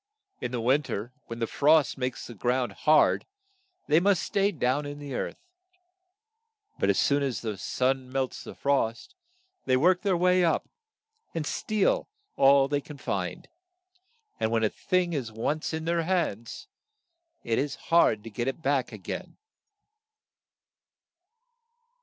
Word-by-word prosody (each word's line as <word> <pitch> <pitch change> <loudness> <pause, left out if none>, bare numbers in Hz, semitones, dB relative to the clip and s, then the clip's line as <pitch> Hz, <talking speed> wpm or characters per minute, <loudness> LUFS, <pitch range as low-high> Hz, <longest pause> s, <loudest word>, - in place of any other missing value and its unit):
In - - -3
the 125 - -2
win 130 +6 +3
ter, 120 -3 -5
when 115 - -6
the 115 - 0
frost 150 +5 +3
makes 130 -1 -3
the 120 - -9
ground 125 +3 0
hard, 155 0 +3 0.6
they 150 +2 +4
must 195 +1 +2
stay 200 0 +1
down 140 -3 0
in 145 0 -6
the 145 -2 -7
earth; - - -3 1.4
but - - +2
as - - +3
soon 140 0 +3
as 135 -3 -2
the 110 -3 -3
sun 130 +5 -1
melts 135 -1 -2
the - - -9
frost, 140 - -1 0.5
they 130 - +3
work 180 +6 +3
their 195 -4 +1
way 180 +1 +4
up, 165 - +1 0.7
and 160 -2 -2
steal 215 - 0 0.3
all 135 0 +5
they 145 0 0
can 145 +1 -11
find; 95 -8 -3 0.9
and 110 - +1
when 115 0 +1
a 110 - +3
thing 180 -2 0
is 130 -7 -3
once 130 +8 -2
in 160 0 -4
their 170 0 +1
hands 165 - -2 0.8
it 115 -1 0
is 140 +1 -1
hard 140 -11 +3
to 115 - -9
get 120 +4 -3
it 135 +5 -3
back 135 -3 +1
a - - -7
gain. - - -7
140 Hz, 155 wpm, -27 LUFS, 120-160 Hz, 1.4 s, all